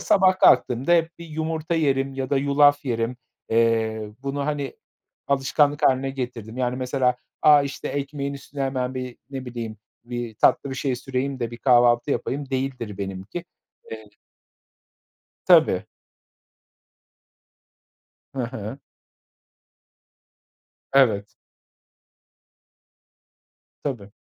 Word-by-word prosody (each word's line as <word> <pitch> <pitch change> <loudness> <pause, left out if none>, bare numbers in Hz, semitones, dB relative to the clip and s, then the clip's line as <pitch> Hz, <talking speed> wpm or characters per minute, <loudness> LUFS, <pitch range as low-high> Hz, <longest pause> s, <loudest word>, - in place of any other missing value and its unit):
sabah 190 -1 +4
kalktığımda 130 +7 +4
hep 170 0 +2
bir 170 - -9
yumurta 160 +1 -3
yerim 135 -3 +1
ya 135 0 -4
da 140 - +3
yulaf 145 +1 +4
yerim, 115 -1 -1 0.3
eee, 110 -2 +1
bunu, 140 +1 -2
hani, 145 -2 -3 0.5
alışkanlık 145 +2 +2
hâline 135 0 +3
getirdim. 120 -4 -6
Yani 125 -1 0
mesela, 125 0 +1 0.3
a, 150 -1 +7
işte 140 0 -5
ekmeğin 140 0 -3
üstüne 140 0 -7
hemen 130 -1 -1
bir 125 -1 -5
ne 135 -2 -6
bileyim 115 -3 -6 0.3
bir 120 -2 -5
tatlı 140 - +3
bir 130 - -4
şey 135 -2 -1
süreyim 135 +2 -3
de 120 -1 -3
bir 120 - -8
kahvaltı 120 +1 +4
yapayım 135 +3 -2
değildir 130 -6 -3
benimki. 95 - -5 0.5
Eee 110 -1 -8 1.4
Tabii. - - +5 2.5
Ha 130 -3 -1
ha. 110 +2 -6 2.1
Evet. 110 -7 +3 2.5
Tabii. 120 -8 -4
130 Hz, 105 wpm, -24 LUFS, 120-140 Hz, 2.5 s, a